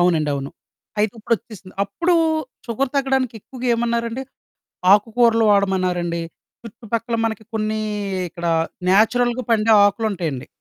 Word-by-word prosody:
అవునండవును. 150 Hz, -6 st, +1 dB, 0.5 s
అయితే, 210 Hz, 0 st, +2 dB
ఇప్పుడొచ్చేసింది. 215 Hz, -3 st, -4 dB
అప్పుడూ 345 Hz, -, 0 dB, 0.5 s
షుగర్ 255 Hz, +3 st, -1 dB
తగ్గడానికెక్కువగా 260 Hz, -2 st, -2 dB
ఏమన్నారండి! 235 Hz, +1 st, -1 dB, 0.7 s
ఆకుకూరలు 225 Hz, +2 st, +4 dB
వాడమన్నారండి, 185 Hz, -4 st, +1 dB, 0.4 s
చుట్టుపక్కల 230 Hz, +1 st, -4 dB
మనకి 220 Hz, -1 st, -3 dB
కొన్నీ 215 Hz, 0 st, -1 dB, 0.5 s
ఇక్కడా 170 Hz, 0 st, -2 dB, 0.4 s
న్యాచురల్‌గా 240 Hz, +5 st, +3 dB
పండే 225 Hz, 0 st, +3 dB
ఆకులుంటయండి. 190 Hz, -, -1 dB
220 Hz, 90 wpm, -21 LUFS, 190-235 Hz, 0.7 s, ఆకుకూరలు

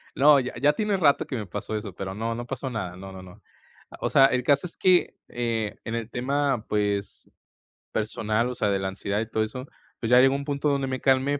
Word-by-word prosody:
No, 145 Hz, 0 st, +6 dB
ya 125 Hz, -1 st, -4 dB
ya 145 Hz, +1 st, +5 dB
tiene 210 Hz, +3 st, 0 dB
rato 145 Hz, -5 st, +3 dB
que 130 Hz, -, -5 dB
me 105 Hz, -3 st, -4 dB
pasó 100 Hz, +4 st, -5 dB
eso, 105 Hz, -4 st, -6 dB
pero 95 Hz, 0 st, -5 dB
no, 115 Hz, +2 st, -3 dB
no 120 Hz, 0 st, -5 dB
pasó 130 Hz, +1 st, -4 dB
nada, 90 Hz, -7 st, -4 dB
no, 95 Hz, +1 st, -9 dB
no, 95 Hz, 0 st, -9 dB
no. 95 Hz, +3 st, -14 dB, 0.6 s
O -, -, -1 dB
sea, 135 Hz, -, +6 dB
el 125 Hz, -2 st, 0 dB
caso 140 Hz, +5 st, +3 dB
es -, -, -8 dB
que, 185 Hz, -1 st, +3 dB
eh, 115 Hz, -3 st, -2 dB
en 115 Hz, -, -3 dB
el 115 Hz, 0 st, -4 dB
tema, 135 Hz, -1 st, -1 dB
pues, 100 Hz, -1 st, -2 dB, 0.6 s
personal, 110 Hz, +2 st, -1 dB
o 125 Hz, -, -5 dB
sea, 105 Hz, -4 st, 0 dB
de 100 Hz, -1 st, +1 dB
la 95 Hz, 0 st, -2 dB
ansiedad 100 Hz, +2 st, -3 dB
y 115 Hz, -, -5 dB
todo 110 Hz, -1 st, 0 dB
eso, 125 Hz, +4 st, -6 dB, 0.3 s
pues, 115 Hz, -, -3 dB
ya 125 Hz, -, +8 dB
llegó 135 Hz, +1 st, +5 dB
un 140 Hz, -, -3 dB
punto 145 Hz, 0 st, -1 dB
donde 140 Hz, -1 st, 0 dB
me 130 Hz, -1 st, -3 dB
calmé 135 Hz, +1 st, +2 dB
120 Hz, 235 wpm, -25 LUFS, 105-135 Hz, 0.6 s, ya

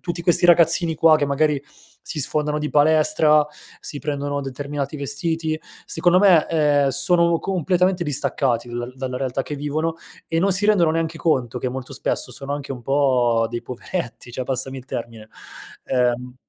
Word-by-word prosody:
tutti 170 Hz, -1 st, -4 dB
questi 175 Hz, 0 st, +2 dB
ragazzini 170 Hz, 0 st, +4 dB
qua 160 Hz, -1 st, +6 dB
che 145 Hz, -, 0 dB
magari, 140 Hz, 0 st, +1 dB, 0.4 s
si 155 Hz, -, -5 dB
sfondano 150 Hz, +1 st, 0 dB
di 150 Hz, 0 st, -3 dB
palestra, 155 Hz, 0 st, +4 dB, 0.3 s
si 145 Hz, -, -5 dB
prendono 145 Hz, -1 st, -3 dB
determinati 140 Hz, +2 st, -5 dB
vestiti, 155 Hz, +3 st, -1 dB, 0.3 s
secondo 180 Hz, 0 st, +2 dB
me, 185 Hz, -6 st, +5 dB
ehm, 145 Hz, -3 st, +2 dB
sono 170 Hz, +3 st, +2 dB
completamente 180 Hz, 0 st, 0 dB
distaccati 130 Hz, -5 st, -1 dB
da 120 Hz, +1 st, -5 dB
dalla 130 Hz, -1 st, -4 dB
realtà 135 Hz, 0 st, -2 dB
che 150 Hz, -, -6 dB
vivono 155 Hz, +3 st, -2 dB, 0.3 s
e 165 Hz, 0 st, -1 dB
non 195 Hz, -, +2 dB
si 200 Hz, +3 st, +3 dB
rendono 180 Hz, -7 st, +4 dB
neanche 165 Hz, 0 st, -2 dB
conto 125 Hz, -7 st, 0 dB
che 130 Hz, -, -1 dB
molto 130 Hz, 0 st, -7 dB
spesso -, -, -2 dB
sono 140 Hz, +1 st, -6 dB
anche 140 Hz, -1 st, -6 dB
un 125 Hz, -2 st, -9 dB
po' 125 Hz, -4 st, +2 dB
dei 120 Hz, 0 st, -5 dB
poveretti, 125 Hz, -1 st, -6 dB
cioè, 130 Hz, -, -4 dB
passami 130 Hz, +1 st, -3 dB
il 125 Hz, -, -12 dB
termine, 115 Hz, -4 st, -7 dB, 0.6 s
ehm 125 Hz, 0 st, 0 dB
145 Hz, 165 wpm, -21 LUFS, 130-165 Hz, 0.6 s, qua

